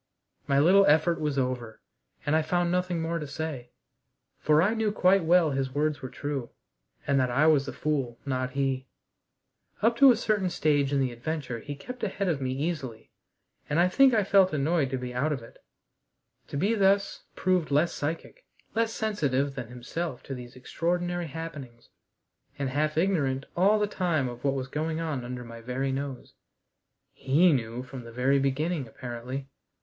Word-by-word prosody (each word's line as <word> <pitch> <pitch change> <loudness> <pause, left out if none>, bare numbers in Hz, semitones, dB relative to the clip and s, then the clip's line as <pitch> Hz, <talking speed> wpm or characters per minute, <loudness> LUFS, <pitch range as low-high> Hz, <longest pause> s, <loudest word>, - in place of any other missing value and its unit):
My 140 - +2
little 185 +7 +6
effort 160 +3 +3
was 150 -2 -1
over, 125 -4 -2 0.5
and 145 - +2
I 160 - +4
found 175 +2 0
nothing 180 -2 0
more 165 +1 -1
to 150 - -5
say, 140 -4 -5 0.7
for 150 0 +3
I 205 +4 +2
knew 220 -2 0
quite 190 -2 +3
well 165 -1 +4
his 135 -1 -2
words 150 0 0
were 130 - -5
true, 140 -4 -4 0.6
and 140 -1 +2
that 130 -1 +2
I 135 +5 +3
was 145 -3 +4
the - - -3
fool, 135 -6 -2
not 130 -2 -2
he. 135 -1 -1 1.0
Up 230 +1 +4
to 275 +1 +8
a 235 - +2
certain 210 -5 0
stage 145 -4 +1
in 140 - +2
the 130 -2 +1
adventure 125 0 -4
he 145 +5 -7
kept 250 - -9
ahead 200 -1 -1
of 155 -6 0
me 130 -1 -1
easily, 135 -5 -4 0.6
and 150 +2 +1
I 175 - +5
think 270 +7 +5
I 215 - +3
felt 195 -2 +4
annoyed 150 0 +1
to 130 - -2
be 125 -1 -5
out 140 +5 0
of 135 -6 -3
it, 115 - -16 0.8
to - - -5
be 200 +9 +2
thus 200 -1 +2
proved 185 -4 +1
less 150 +4 +2
psychic, 165 - -5 0.3
less 230 0 +1
sensitive 145 - 0
than 125 -4 -6
himself 125 +4 -5
to 135 - -6
these 125 -2 -9
extraordinary 175 +6 -2
happenings, 145 -7 -8 0.7
and 140 -2 -2
half 155 +2 0
ignorant 145 -7 +1
all 200 +5 +4
the 210 - +2
time 175 -9 0
of 120 0 -8
what 140 -1 +1
was 130 -1 -3
going 155 +4 -2
on 155 -6 -3
under 125 0 -6
my 115 -1 -10
very 130 +3 -2
nose. 135 -1 -5 0.8
He 155 +6 +3
knew 120 -1 -2
from 130 -1 -9
the 115 - -10
very 130 +4 +2
beginning, 140 +2 -1
apparently. 125 +3 -6
145 Hz, 180 wpm, -28 LUFS, 130-175 Hz, 1.0 s, to